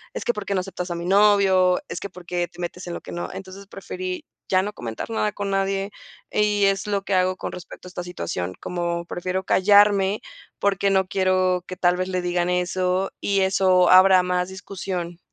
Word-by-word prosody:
"Es - - -4
que, 240 - +2
¿por 210 -2 -6
qué 200 - 0
no 185 - +1
aceptas 180 -1 -6
a - - -2
mi 170 0 -5
novio? 195 -2 +4
Es - - -4
que, 200 - -6
¿por 180 -1 -13
qué 175 0 -1
te 175 0 -19
metes 180 +1 -5
en 175 - -4
lo - - -7
que - - -10
no". 175 - -5
Entonces, 195 +1 -9
preferí 185 -2 -6 0.3
ya 185 0 +4
no 210 +1 -4
comentar 115 - -6
nada 215 -1 0
con 200 -1 -4
nadie. 195 +1 -1 0.4
Y 210 -1 +2
es 195 +1 +1
lo 200 -1 -1
que 200 - -3
hago, 185 0 +2
con - - -5
respecto 180 0 -10
a - - -8
esta 180 - -6
situación, 95 - -4
como 170 -1 -3
prefiero 185 +2 -3
callarme, 200 +1 +4 0.4
porque 200 0 +1
no 190 -1 +3
quiero 185 -1 +1
que 185 - -6
tal 180 0 +2
vez 185 0 -1
le 185 -1 -1
digan 175 0 0
eso, 180 +1 0
y 195 -1 +1
eso 185 -1 +3
habrá 185 0 +7
más 180 0 -1
discusión. 185 -2 -5
185 Hz, 210 wpm, -23 LUFS, 180-195 Hz, 0.4 s, habrá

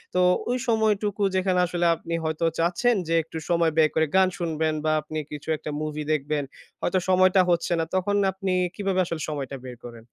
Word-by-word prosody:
তো - - +3 0.3
ওই 250 - +1
সময়টুকু 210 -2 +1
যেখানে 185 -1 +2
আসলে 175 0 -1
আপনি 165 +1 -7
হয়তো 160 +1 -1
চাচ্ছেন 200 +8 +2
যে, 165 - 0
একটু 160 0 -8
সময় 170 -1 +3
বের 155 -1 +5
করে 160 0 +3
গান 190 -1 +6
শুনবেন 160 -2 -1
বা 155 - +3
আপনি 155 +1 -7
কিছু 150 0 -8
একটা 150 - -7
মুভি 150 0 -3
দেখবেন, 150 0 0 0.4
হয়তো 185 +1 +1
সময়টা 185 0 +5
হচ্ছে 175 0 +1
না। 165 - 0
তখন 205 +2 +1 0.2
আপনি 190 0 -2 0.2
কিভাবে 195 -2 -1
আসলে 165 -2 -4
সময়টা 140 -2 -4
বের 125 -1 -7
করেন? 120 -2 -10
170 Hz, 190 wpm, -25 LUFS, 155-190 Hz, 0.4 s, গান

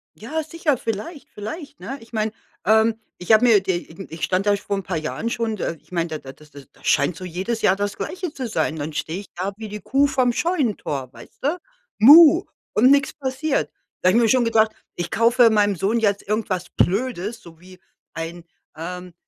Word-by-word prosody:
Ja, 310 +9 -4
sicher, 310 -3 -1
vielleicht, 230 - -5
vielleicht, 285 +8 -7
ne? 270 - -6
Ich 225 - -17
meine, 220 -1 -1 0.3
ähm, 220 +2 +3 0.2
ich 180 +5 -2
habe 220 +3 +6
mir 220 -4 +6
d 185 -2 0
irgen 175 +2 -10
ich 160 0 -8
stand 185 +2 +1
erst 205 -1 +1
vor 200 - -2
'n 195 - -4
paar 180 -1 -3
Jahren 155 +9 -3
schon 230 -2 -2
d - - -5
äh, 165 - -3
ich - - -30
meine, 170 -1 -1
da 155 - -4
da 135 -2 -11
das 150 +1 -19
da 140 -1 -13 0.2
scheint 145 +4 +2
so 185 - -9
jedes 190 +6 -3
Jahr 190 - +4
das 205 0 -2
Gleiche 360 -4 -5
zu 260 -2 -4
sein. 210 -7 -1
Dann 155 0 -4
stehe 160 +4 -3
ich 200 - -14
da 190 +3 -3
wie 220 -1 -7
die 210 - -6
Kuh 275 +6 +2
vom 255 -3 +1
Scheunentor, 230 - -1
weißt - - -16
du, 300 +6 +1 0.4
Muh, 315 +7 +9 0.3
und 255 +5 +5
nix 280 -1 +3
passiert. 275 +1 -2 0.3
Da 185 - +4
habe 225 +5 +4
mir 230 - +4
schon 255 +1 +4
gedacht: 225 -1 +3 0.2
„Ich 175 -1 -4
kaufe 235 +1 +5
meinem 205 -2 +2
Sohn 215 +7 +1
jetzt 200 -2 0
irgendwas 200 -5 -2
Blödes, 215 +1 -1
so 165 -1 -15
wie 185 0 -15 0.3
ein, 165 +1 -6 0.3
ähm, 180 +2 -7
215 Hz, 210 wpm, -22 LUFS, 180-250 Hz, 0.4 s, Muh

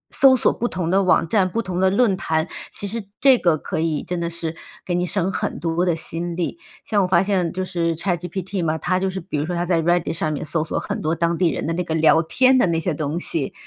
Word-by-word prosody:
搜 270 -1 +7
索 - - +2
不 240 - -2
同 170 -5 -3
的 195 +1 +4
网 185 -3 +3
站， 190 +1 +2
不 230 +5 -2
同 180 -3 -3
的 190 0 +4
论 200 0 +2
坛。 160 -2 -1 0.2
其 - - -4
实 205 0 -5
这 265 -3 +5
个 170 -3 +2
可 155 - -4
以 160 -2 -1
真 180 -1 -3
的 170 0 -2
是 165 -1 -3 0.3
给 180 - -2
你 175 0 0
省 190 0 0
很 - - -3
多 170 +2 0
的 170 - +2
心 170 +1 -2
力， 175 - -3 0.3
像 210 -2 +1
我 185 - +1
发 180 0 +3
现 190 -4 0
就 185 +2 -3
是 170 -2 -1
Chatgpt 180 +2 -3
嘛， 160 -1 0
它 185 +3 0
就 190 0 0
是 190 0 -4
比 160 -4 -4
如 145 - -1
说 175 - -2
它 175 0 -1
在 170 -2 +1
Reddit 175 +1 +1
上 155 -1 -2
面 150 +1 -4
搜 155 +1 0
索 160 - -4
很 - - -3
多 160 +2 0
当 170 +1 0
地 180 -2 +3
人 - - -3
的 165 - -1
那 180 +2 -1
个 160 -2 -3
聊 160 0 +5
天 255 +10 +3
的 220 - +3
那 165 -1 0
些 170 +1 -1
东 150 +2 -3
西， 160 -5 -2
175 Hz, 335 characters per minute, -21 LUFS, 165-190 Hz, 0.3 s, 搜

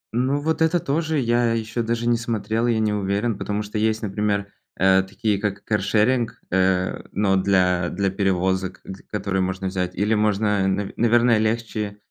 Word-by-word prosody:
Ну, 130 +3 +1
вот 160 +2 -1
это 165 +2 +3
тоже, 160 +2 -1
я 120 -2 +2
ещё 115 +1 -2
даже 115 +1 -1
не 120 -1 +3
смотрел, 115 0 -1
я 115 -2 +2
не 105 -1 +1
уверен, 100 +2 -1
потому 105 +1 -3
что 105 +1 -4
есть, 110 0 0
например, 100 0 -1 0.3
э, 95 +1 +4
такие 100 +2 -2
как 100 -1 -3
каршеринг, 110 +4 +1
э, 95 0 +1
но 100 -1 +1
для 90 -2 +2
для 95 0 -1
перевозок, 95 -1 -1
г 95 0 -9
которые 100 -2 -1
можно 95 +1 -2
взять, 90 -1 -3
или 105 +4 +1
можно, 105 -2 +1
нав 95 +1 -1
наверное, 120 -1 +4
легче, 110 -2 -2
105 Hz, 170 wpm, -22 LUFS, 95-115 Hz, 0.3 s, э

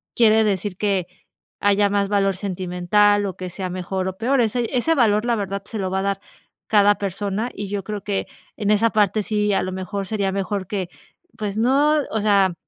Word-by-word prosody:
quiere 220 -1 +5
decir 195 -2 -1
que 195 -4 0 0.5
haya 205 0 +3
más 200 0 +1
valor 195 -1 +2
sentimental 195 +2 +1
o 190 - -5
que 185 -1 -5
sea 185 +1 -4
mejor 185 +1 -3
o 190 - -4
peor, 260 +4 +1
ese 235 +1 0
ese 290 +7 +2
valor, 215 -5 +3
la 240 -1 +2
verdad, 200 -2 -3
se 220 0 -5
lo 185 -1 -2
va 190 - 0
a - - -1
dar 200 0 -1 0.5
cada 205 -1 +5
persona, 200 +4 -3
y 205 0 -5
yo 200 -1 -3
creo 210 +1 -4
que 200 -1 -2 0.3
en 210 0 0
esa 220 +2 +3
parte 210 0 +2
sí, 210 0 0
a - - +2
lo 185 0 -4
mejor 195 +1 -4
sería 200 -2 -1
mejor 195 -1 -2
que, 190 -4 -3 0.5
pues 210 -1 -3
no, 280 +6 +3
o 220 - -1
sea, 200 -3 +3
205 Hz, 205 wpm, -22 LUFS, 190-215 Hz, 0.5 s, quiere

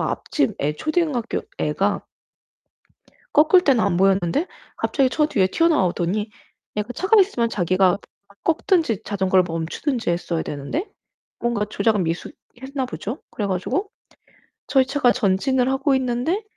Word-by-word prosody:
앞집 - - -1
애 150 +1 0
초등학교 310 -7 -1 0.2
애가 - - 0 1.3
꺾을 320 +5 +6
때는 260 -8 +3
안 185 -3 +1
보였는데 195 - +2 0.3
갑자기 270 -3 +1
저 300 +2 +2
뒤에 200 -11 +2
튀어나오더니 210 - +1 0.5
얘가 210 +4 -2
차가 405 - +4
있으면 245 - +1
자기가 185 -1 +2 0.5
꺾든지 325 - +1
자전거를 190 -2 +2
멈추든지 175 - -2
했어야 170 -1 -1
되는데 150 - -4 0.5
뭔가 235 -3 0
조작 215 0 +1
미수했나 255 - -5
보죠. 240 +3 -5
그래 210 - -3
가지고 245 - -2 0.8
저희 265 -2 +4
차가 265 -2 +2
전진을 250 +4 +1
하고 270 +1 +2
있는데 260 - -1
240 Hz, 305 characters per minute, -22 LUFS, 190-290 Hz, 1.3 s, 꺾을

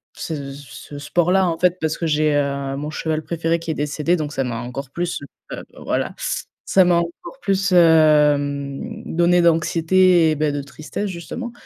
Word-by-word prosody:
ce 145 -4 -5
ce 145 +1 -10
sport-là 175 +5 +2
en 165 -1 -1
fait, 180 0 +2
parce 160 0 -1
que 165 - -2
j'ai, 150 -1 +2
heu, 140 -1 -1
mon 150 +2 -4
cheval 155 0 -2
préféré 165 0 -1
qui 165 -1 -4
est - - -1
décédé, 150 +3 0
donc 155 -2 -4
ça 135 - -1
m'a 120 -3 -3
encore 125 +2 -6
plus, 175 +3 -3
heu, - - -8 0.3
beh, - - -7 0.2
voilà, - - -2 0.5
ça 190 - +4
m'a 175 -1 +3
encore 170 - -5
plus 195 -1 0
hem 150 +3 +3
donné 175 +1 +2
d'anxiété 170 +1 +3
et - - 0
ben, 150 0 0
de 145 - -2
tristesse 155 +8 -6
justement, 190 +7 -6
160 Hz, 180 wpm, -21 LUFS, 145-175 Hz, 0.5 s, ça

